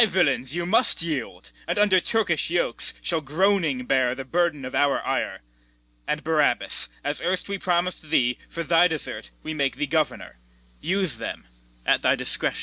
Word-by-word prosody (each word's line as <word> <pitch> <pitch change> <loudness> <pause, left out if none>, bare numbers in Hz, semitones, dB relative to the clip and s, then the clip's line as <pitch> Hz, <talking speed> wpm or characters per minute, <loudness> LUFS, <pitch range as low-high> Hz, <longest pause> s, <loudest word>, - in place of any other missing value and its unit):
Ay, 225 - +7
villains, 145 -7 +1
you 175 0 -1
must 215 -1 +2
yield, 130 - -4 0.2
and 175 - -1
under 205 -3 +5
Turkish 185 -6 0
yokes 175 +1 -1
Shall 165 -2 0
groaning 155 -3 +1
bear 125 -1 +2
the 135 0 -6
burden 165 -2 0
of 130 - -6
our 140 +1 +3
ire: - - -1 0.7
And, 150 - -1
Barabas, 155 -2 +1
as 145 +1 -2
erst 180 +2 -1
we 200 -1 -3
promis'd 175 -3 -1
thee, 125 -5 +2
For 170 - -4
thy 165 +2 +5
desert 155 - -5
we 155 - -4
make 140 -3 0
thee 150 - -1
governor; 130 - -1 0.4
Use 185 - -1
them 115 - -5 0.4
at - - +3
thy - - +4
discretion. - - -2
160 Hz, 170 wpm, -25 LUFS, 135-180 Hz, 0.7 s, Ay